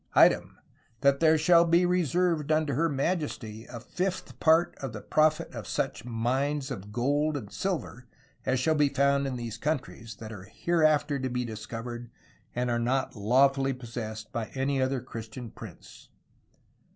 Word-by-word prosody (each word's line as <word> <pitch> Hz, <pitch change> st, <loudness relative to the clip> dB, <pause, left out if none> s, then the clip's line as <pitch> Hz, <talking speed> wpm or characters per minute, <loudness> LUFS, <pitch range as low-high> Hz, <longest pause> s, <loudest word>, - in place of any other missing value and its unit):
Item -, -, +5 dB, 0.4 s
that 140 Hz, 0 st, +4 dB
there 160 Hz, -1 st, +5 dB
shall 170 Hz, +2 st, +6 dB
be 170 Hz, +1 st, +4 dB
reserved 175 Hz, -2 st, +1 dB
vnto 155 Hz, -1 st, +2 dB
her 165 Hz, +6 st, +2 dB
Ma*^® 135 Hz, -7 st, -2 dB
a 120 Hz, -, -6 dB
V*^ 180 Hz, +10 st, -4 dB
parte 160 Hz, +1 st, +4 dB
of 135 Hz, -4 st, -5 dB
the 105 Hz, -, -6 dB
proff 155 Hz, 0 st, +3 dB
yt -, -, -8 dB
of -, -, -6 dB
sooche -, -, -2 dB
mynes 130 Hz, +5 st, -1 dB
of 105 Hz, -5 st, -6 dB
goold 145 Hz, +6 st, +1 dB
and 105 Hz, -7 st, -7 dB
sylver 170 Hz, -9 st, -3 dB, 0.4 s
as 130 Hz, 0 st, +1 dB
shall 160 Hz, +5 st, +2 dB
be 150 Hz, -2 st, +3 dB
found 140 Hz, 0 st, +2 dB
in 130 Hz, -, -3 dB
these 115 Hz, -2 st, -5 dB
contreys 125 Hz, -6 st, -3 dB
y* 110 Hz, -, -7 dB
are 100 Hz, -3 st, -9 dB
hereafter 155 Hz, -, +2 dB
to 130 Hz, 0 st, -2 dB
be 125 Hz, 0 st, -2 dB
discovered 115 Hz, +2 st, -6 dB, 0.5 s
and 125 Hz, 0 st, 0 dB
are 120 Hz, -, +1 dB
not 130 Hz, +3 st, 0 dB
lawfully 135 Hz, +5 st, +3 dB
possessed 115 Hz, -3 st, -7 dB
by 115 Hz, -1 st, -2 dB
any 135 Hz, 0 st, 0 dB
other 130 Hz, -1 st, 0 dB
Christy 115 Hz, -1 st, -8 dB
an 120 Hz, -3 st, -8 dB
Prince. -, -, -12 dB
135 Hz, 165 wpm, -28 LUFS, 120-155 Hz, 0.5 s, shall